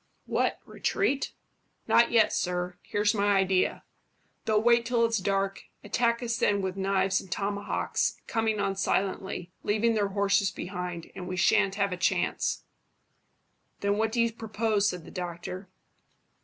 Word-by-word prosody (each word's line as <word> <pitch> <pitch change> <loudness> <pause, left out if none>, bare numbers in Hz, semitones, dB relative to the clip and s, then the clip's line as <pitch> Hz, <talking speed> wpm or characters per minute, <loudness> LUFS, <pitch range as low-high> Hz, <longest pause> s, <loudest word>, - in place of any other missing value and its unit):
"What, - - 0
retreat?" 280 -9 -1 0.6
"Not 235 - +5
yet, 230 -2 +4
sir. 180 0 -2
Here's 205 0 +1
my 205 -1 +2
idea. 190 -1 +1 0.6
They'll 215 -1 +3
wait 235 +1 +4
till 235 -1 +2
it's 225 -2 +1
dark, 195 0 -1 0.2
attack 235 +3 +1
us 230 -1 -1
then 205 -4 +2
with 190 -1 -2
knives 195 0 +1
and 190 - -15
tomahawks, 200 +1 -1
coming 220 -2 0
on 195 -1 0
silently, 190 -2 -1
leaving 220 +3 +2
their 210 -2 +1
horses 200 0 +2
behind, 180 -3 -6
and 180 - -7
we 185 0 -4
shan't 200 +1 +3
have 200 -1 0
a - - -4
chance." 180 - 0 1.2
"Then 200 +1 +1
what 220 0 +1
do 235 - -1
you 230 -1 +2
propose?" 215 -2 0
said 180 -3 -6
the - - -11
doctor. 180 +1 -6
200 Hz, 150 wpm, -28 LUFS, 190-220 Hz, 1.2 s, Not